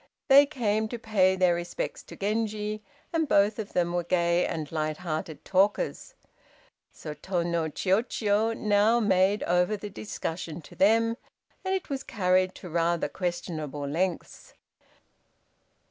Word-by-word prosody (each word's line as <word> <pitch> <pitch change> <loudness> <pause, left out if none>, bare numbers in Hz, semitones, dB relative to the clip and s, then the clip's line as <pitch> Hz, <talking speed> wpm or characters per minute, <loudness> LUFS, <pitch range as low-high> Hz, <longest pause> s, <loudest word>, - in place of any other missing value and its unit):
They 280 +1 +8
came 220 -6 0
to 240 - -5
pay 200 -5 +2
their 185 -2 +3
respects 175 0 -4
to - - -11
Genji, 215 0 -2 0.3
and 320 -2 +1
both 205 -2 +3
of 210 - -6
them 175 -1 +1
were 175 0 0
gay 170 0 +2
and 155 -2 -4
light 155 -1 -2
hearted 160 -3 -5
talkers. 200 - +1 0.8
So 155 - -7
Tô 170 +3 -2
no 170 -2 0
Chiûjiô 210 - +1
now 210 +2 +3
made 195 -1 +2
over 180 +4 +2
the 205 +1 -7
discussion 170 -5 -5
to - - -14
them, 230 +3 +3 0.5
and 380 0 0
it 370 -5 -5
was 270 -1 -2
carried 185 -4 +1
to 185 - -9
rather 170 -1 +1
questionable 155 -5 -4
lengths. 175 +5 -3
190 Hz, 140 wpm, -27 LUFS, 170-215 Hz, 0.8 s, They